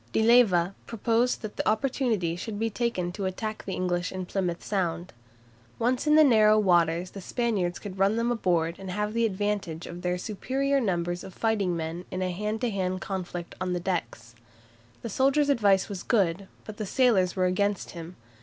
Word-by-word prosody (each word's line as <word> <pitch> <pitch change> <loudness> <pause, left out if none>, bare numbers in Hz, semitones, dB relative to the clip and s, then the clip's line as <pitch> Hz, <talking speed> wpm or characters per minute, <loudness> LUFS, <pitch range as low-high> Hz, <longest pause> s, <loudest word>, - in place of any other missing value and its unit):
De 220 - +2
Leyva 200 -7 +5
proposed 230 +2 0
that 215 - -6
the - - +1
opportunity 220 -7 0
should 205 +4 -5
be 225 +1 -1
taken 200 -6 -1
to 195 +1 -4
attack 215 +3 -4
the 190 - -4
English 180 -1 -1
in 185 -1 -4
Plymouth 180 -2 -2
Sound. 175 -3 -2 0.6
Once 250 +5 0
in 300 - +5
the 310 - +8
narrow 215 -5 +5
waters 175 -3 +2
the 195 - -8
Spaniards 195 -5 -1
could 195 -2 -8
run 195 +2 +3
them 230 +1 0
aboard 175 -7 0
and 190 -1 -7
have 210 +3 -2
the 230 0 +2
advantage 195 -5 -2
of 175 +1 -8
their 180 0 -1
superior 265 +8 -1
numbers 175 -4 -1
of 190 -2 -10
fighting 205 -6 0
men 165 +2 -5
in 185 0 -3
a 185 - -1
hand 210 +4 -3
to 245 -2 0
hand 185 -2 -1
conflict 180 -2 -5
on 185 -1 -1
the 175 - -1
decks. 165 -10 -4 0.7
The 230 - -4
soldier's 275 +6 +2
advice 200 -8 +3
was 195 -4 -6
good, 195 -4 +1 0.2
but 215 -1 -8
the 215 - -4
sailors 205 -7 +3
were 185 -1 +2
against 200 +2 0
him. 170 +1 -9
195 Hz, 190 wpm, -27 LUFS, 180-225 Hz, 0.7 s, the